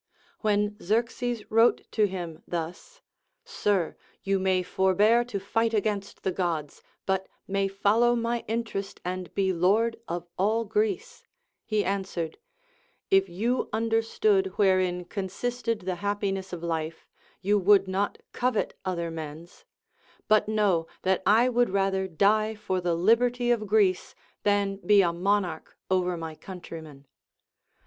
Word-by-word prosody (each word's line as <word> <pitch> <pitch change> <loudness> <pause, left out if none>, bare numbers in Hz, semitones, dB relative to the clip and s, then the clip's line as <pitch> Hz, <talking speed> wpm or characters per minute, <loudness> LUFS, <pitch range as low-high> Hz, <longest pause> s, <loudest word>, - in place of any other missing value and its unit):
When 210 -1 +1
Xerxes 230 +2 -1
wrote 225 +2 +4
to 215 -2 +3
him 175 -4 -6
thus, 175 - -6 0.4
Sir, 205 - 0 0.3
you 195 0 +1
may 185 -1 +1
forbear 200 +6 +3
to 215 -5 -4
fight 225 +3 0
against 205 -1 -2
the 190 - +1
Gods, 165 -6 -3 0.2
but 190 0 0 0.2
may 195 0 +1
follow 210 +5 +3
my 235 0 -1
interest 220 -3 -3
and 180 0 -4
be 190 -1 +2
lord 210 +7 +2
of 175 0 -4
all 220 +4 +2
Greece, 430 - -2 0.4
he 210 -2 +1
answered: 190 - -3 0.7
If 195 0 +4
you 230 +9 -1
understood 225 - +2
wherein 185 -3 +2
consisted 230 +5 -3
the 185 -1 -3
happi 205 -1 0
ness 190 -1 -5
of 175 -2 -6
life, 165 -1 -3 0.4
you 205 +2 +3
would 195 0 +5
not 195 +2 -1 0.2
covet 250 -3 0
other 170 -3 -2
men's; 160 +2 -8 0.6
but 215 -1 +4
know 205 -6 +1 0.2
that 190 0 +2
I 225 +4 +5
Avould 245 -3 +2
rather 195 -1 +1
die 215 +5 +2
for 190 -3 -2
the 175 -1 0
liberty 240 +6 +3
of 215 -3 0
Greece 200 -3 +2 0.3
than 200 -1 +1
be 205 0 +4
a 170 -1 +1
monarch 180 -2 -1
over 180 -1 +1
my 165 -1 -5
countrymen. 160 -5 -10
195 Hz, 135 wpm, -27 LUFS, 180-220 Hz, 0.7 s, would